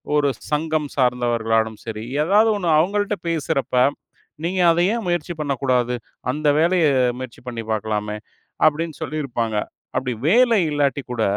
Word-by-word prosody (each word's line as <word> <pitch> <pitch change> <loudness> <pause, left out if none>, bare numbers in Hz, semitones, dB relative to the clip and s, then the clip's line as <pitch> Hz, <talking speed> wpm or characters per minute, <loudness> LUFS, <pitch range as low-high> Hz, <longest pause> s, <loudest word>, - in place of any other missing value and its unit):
ஒரு 145 -1 +3 0.2
சங்கம் 155 0 0
சார்ந்தவர்களானாலும் 115 -4 +1
சரி 110 -1 -5 0.2
ஏதாவது 210 +7 +4
1 180 -4 -3
அவுங்கள்ட 205 +5 +1
பேசுறப்ப, 145 -5 -1 0.7
நீங்க 185 +2 -1
அத 165 - +1
ஏன் 230 -4 -3
முயற்சி 175 -1 -1
பண்ணக்கூடாது? 130 -4 0 0.4
அந்த 150 +2 -2
வேலைய 170 0 +3 0.3
முயற்சி 130 -2 -8
பண்ணி 115 -2 -4
பார்க்கலாமே! 105 -1 -2 0.5
அப்பிடீன்னு 155 +1 +1
சொல்லியிருப்பாங்க. 120 -7 -2 0.4
அப்படி 125 0 -1
வேலை 235 +4 +5
இல்லாட்டி 145 -1 0
கூட, 115 -2 0
145 Hz, 125 wpm, -21 LUFS, 120-170 Hz, 0.7 s, வேலை